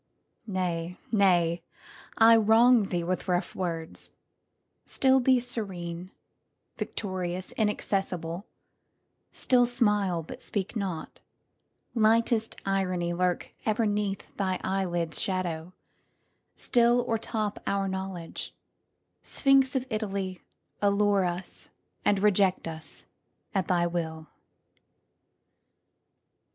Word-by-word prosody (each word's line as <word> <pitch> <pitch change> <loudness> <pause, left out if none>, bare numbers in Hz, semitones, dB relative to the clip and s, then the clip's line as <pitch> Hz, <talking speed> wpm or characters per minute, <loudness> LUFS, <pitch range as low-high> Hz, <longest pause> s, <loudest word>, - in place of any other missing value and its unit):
Nay, 180 -3 -2
nay,—I 185 +3 +2
wrong 225 +1 +5
thee 175 -3 -2
with 185 +3 -2
rough 180 0 0
words; 165 -3 -4 0.7
still 265 0 +3
beSerene, 200 -9 -1 0.7
victorious, 185 -2 -4
inaccessible; 195 -4 -1 0.8
Still 245 -2 +3
smile 210 -8 +1
but - - -9
speak 200 +2 -3
not; 190 -6 -4 0.7
lightest 225 0 +2
ironyLurk 180 -2 0
ever' 220 +1 +1
neath 205 -1 -1
thy 190 -2 0
eyelids' 175 -4 -1
shadow; 180 -3 -2 0.9
stillO'ertop 230 -3 +1
our 200 0 0
knowledge; 190 -3 -5 0.7
Sphinx 275 -1 +3
of 260 -1 0
Italy, 195 -4 -3 0.4
Allure 200 -1 +3
us 175 +1 -5 0.3
and 205 - +3
reject 195 -3 +2
us 160 -2 -6 0.5
at 190 -4 0
thy 175 -2 +2
will! 160 -2 -3
195 Hz, 85 wpm, -28 LUFS, 175-215 Hz, 0.9 s, wrong